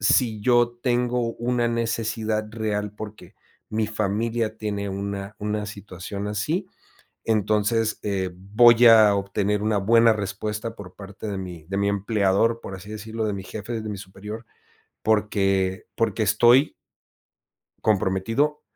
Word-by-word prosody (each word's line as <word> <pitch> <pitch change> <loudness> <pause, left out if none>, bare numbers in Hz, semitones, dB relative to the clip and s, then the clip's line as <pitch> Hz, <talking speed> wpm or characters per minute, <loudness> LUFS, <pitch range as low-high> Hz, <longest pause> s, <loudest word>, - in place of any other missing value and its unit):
Si 110 -1 +2
yo 120 +1 +2
tengo 120 -1 +1
una 120 0 0
necesidad 110 -2 -1
real, 105 -2 -2
porque 105 0 -9 0.3
mi 110 0 -1
familia 110 +2 -1
tiene 100 -1 -3
una 100 +1 -5
una 105 0 -2
situación 100 0 -6
así, 150 - -1 0.6
entonces, 110 +1 +1
eh, 95 -3 -2
voy 115 +6 +5
a 110 -2 +7
obtener 100 +1 -1
una 105 0 +1
buena 115 +3 +5
respuesta 105 +2 -4
por 95 -4 -11
parte 100 +2 -9
de 100 -2 -3
mi 90 -4 -7
de 95 +4 -3
mi 100 0 +1
empleador, 100 +2 +1
por - - -7
así 95 +2 -11
decirlo, 110 +1 -4
de 105 - -1
mi 95 -1 -5
jefe, 110 +4 -5
de 110 - -5
mi 105 - -4
superior, 105 +4 -9 0.6
porque 95 -3 +1
porque - - 0
estoy 125 +5 +5 1.1
comprometido 110 +9 +1
105 Hz, 135 wpm, -24 LUFS, 100-115 Hz, 1.1 s, a